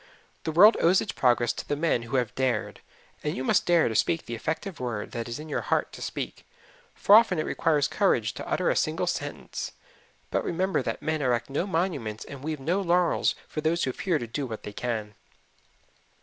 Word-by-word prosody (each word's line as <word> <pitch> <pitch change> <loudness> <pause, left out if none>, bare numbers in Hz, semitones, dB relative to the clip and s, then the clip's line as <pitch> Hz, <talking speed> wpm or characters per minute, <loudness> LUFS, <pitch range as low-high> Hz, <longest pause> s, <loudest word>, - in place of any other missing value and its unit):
The 160 - 0
world 200 +8 +7
owes 180 +3 +5
its - - -3
progress 120 -2 +2
to - - -7
the 145 - 0
men 150 -5 +1
who 120 +3 -5
have 125 -4 0
dared, 130 -2 -1 0.4
and 150 - -2
you 130 - -2
must - - +2
dare 175 -2 +4
to 115 - -2
speak 165 +8 +1
the 120 - -6
effective 160 - -4
word 120 -5 -4
that 115 0 -4
is 115 - -4
in 155 +1 -8
your 150 - -2
heart - - 0
to - - -9
speak - - -5 0.5
for 200 - +4
often 220 -5 +7
it 155 - 0
requires 150 -3 +1
courage - - +1
to - - -7
utter - - +1
a - - 0
single - - 0
sentence. - - -4 0.6
But - - 0
remember 185 +3 0
that - - -4
men 155 -1 -1
erect 120 -1 0
no 160 +7 -1
monuments 155 - -2
and 140 -2 -9
weave 155 -1 -3
no 170 +8 0
laurels 175 -1 +2
for 155 - -4
those 165 +2 +1
who 130 - 0
fear 175 +4 0
to 120 - -4
do 130 +4 -4
what 110 -2 -7
they 105 - -7
can. 110 -3 -3
150 Hz, 210 wpm, -27 LUFS, 120-170 Hz, 0.6 s, world